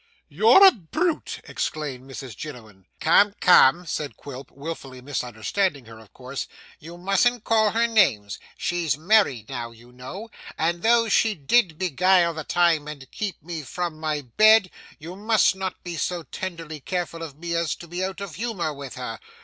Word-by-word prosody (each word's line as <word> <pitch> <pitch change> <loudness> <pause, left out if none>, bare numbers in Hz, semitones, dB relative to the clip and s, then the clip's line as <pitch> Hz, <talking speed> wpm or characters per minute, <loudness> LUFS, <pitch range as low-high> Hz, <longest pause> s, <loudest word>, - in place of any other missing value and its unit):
'You're 400 -3 +6
a 385 - +10
brute!' 310 - -3
exclaimed 135 -4 -4
Mrs 130 -4 -8
Jiniwin. 110 -9 -10
'Come 200 +5 +4
come,' 175 -1 +6
said 150 -3 -4
Quilp, 140 -1 -9
wilfully 140 -3 -8
misunderstanding 130 - -2
her, 110 0 -12
of 110 -2 -17
course, 130 +1 -6 0.3
'you 170 +3 -11
mustn't 195 +6 +1
call 220 -1 +3
her 230 +3 +1
names. 150 - +2 0.2
She's 170 -5 -1
married 160 - +2
now, 120 -1 -5
you 115 +1 -17
know. 155 - -9 0.3
And 170 +2 0
though 230 +2 +4
she 220 0 +2
did 165 - +2
beguile 180 0 +3
the 160 -1 -6
time 170 -3 +2
and 140 -4 -9
keep 205 -8 -5
me 165 -1 -5
from 160 +3 -5
my 155 -2 -2
bed, 215 - +4 0.3
you 170 +3 -9
must 210 0 +2
not 190 -1 -5
be 175 -1 -5
so 175 +1 -2
tenderly 165 -4 -7
careful 170 +2 -4
of 150 -4 -8
me 170 +1 -4
as 170 -1 0
to 170 - -12
be 175 +3 -4
out 190 +1 -4
of 200 -5 -6
humour 195 -8 -3
with 140 -2 -9
her. 125 -3 -6
165 Hz, 170 wpm, -24 LUFS, 140-190 Hz, 0.3 s, a